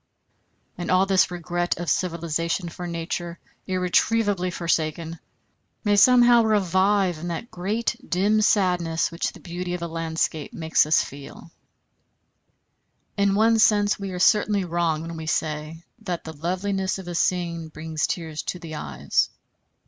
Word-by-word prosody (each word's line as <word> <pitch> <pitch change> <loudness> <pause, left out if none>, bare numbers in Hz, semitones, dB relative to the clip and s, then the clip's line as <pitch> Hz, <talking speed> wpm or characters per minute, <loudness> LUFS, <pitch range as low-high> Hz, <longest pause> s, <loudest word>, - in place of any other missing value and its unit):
And 175 - -4
all 185 +1 +4
this 195 -1 +3
regret 175 0 -2
of 175 0 -5
civilization 170 +1 -1
for 175 +2 -7
Nature 170 0 -4 0.3
irretrievably 185 +1 +1
forsaken, 165 -1 -2 0.6
may 205 -1 +3
somehow 240 +2 +6
revive 195 -3 +2
in 170 - -5
that 175 +8 -5
great 205 +6 -1
soft 245 +3 -16
dim 205 +4 +2
sadness 180 -6 +2
which 170 - -2
the - - -14
beauty 180 0 -4
of 175 - -6
a - - -2
landscape 160 -2 -2
makes 160 -2 +2
us 155 - +4
feel. 140 0 -11 1.6
In 200 -1 +2
one 225 +2 +4
sense 205 -1 +3
we 200 -1 -4
are 180 - -5
certainly 205 +1 +3
wrong 165 -2 0
when 165 0 -6
we 160 0 -7
say 155 +1 -2 0.2
that 175 -2 -4
the 160 - -7
loveliness 185 +5 -2
of 190 -2 -9
a 175 - -4
scene 170 -1 -1
brings 155 0 -3
tears 160 -3 -4
to - - -4
the 165 -3 -9
eyes. 70 - -1
175 Hz, 150 wpm, -24 LUFS, 165-195 Hz, 1.6 s, somehow